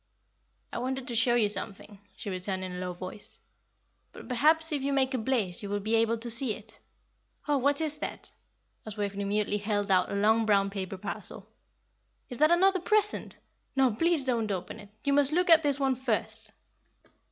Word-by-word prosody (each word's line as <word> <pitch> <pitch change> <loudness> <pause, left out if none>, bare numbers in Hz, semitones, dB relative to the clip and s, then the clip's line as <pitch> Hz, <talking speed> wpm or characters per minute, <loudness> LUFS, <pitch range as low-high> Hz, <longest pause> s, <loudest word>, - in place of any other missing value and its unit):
"I - - -3
wanted 260 +1 -3
to 240 - -4
show 240 +1 +3
you 225 -3 +3
something," 205 0 -6 0.2
she 205 - -6
returned, 185 +1 -3
in 185 - -5
a 180 - -6
low 180 0 -3
voice; 185 +3 -8 0.7
"but - - -11
perhaps 315 +6 +4
if 290 -2 -1
you 280 +1 -1
make 265 -1 +1
a 255 - 0
blaze 220 -7 0
you 200 - -6
will 205 0 -1
be 215 +3 -3
able 230 +1 +2
to 235 +1 -3
see 230 -2 +3
it. 220 +1 -12 0.7
Oh, 290 -2 +2
what 285 +4 +2
is 305 -1 0
that?" - - -5 0.5
as 215 -1 -8
Waveney 200 -1 -3
mutely 210 +1 0
held 205 -1 -1
out 185 -1 +3
a - - -2
long 220 +2 +3
brown 200 -1 +3
paper 195 -1 -5
parcel. - - -6 0.8
"Is 245 - -7
that 305 +1 +5
another 375 +2 +4
present? 420 +3 0 0.4
No, 265 -4 +3
please 330 +5 +2
don't 235 -4 0
open 185 -2 -5
it; 205 - -13
you 280 - +1
must 285 +1 +2
look 360 +1 +2
at 325 -1 +8
this 285 -2 0
one 270 -1 +2
first." 250 -3 -2
230 Hz, 195 wpm, -28 LUFS, 205-280 Hz, 0.8 s, at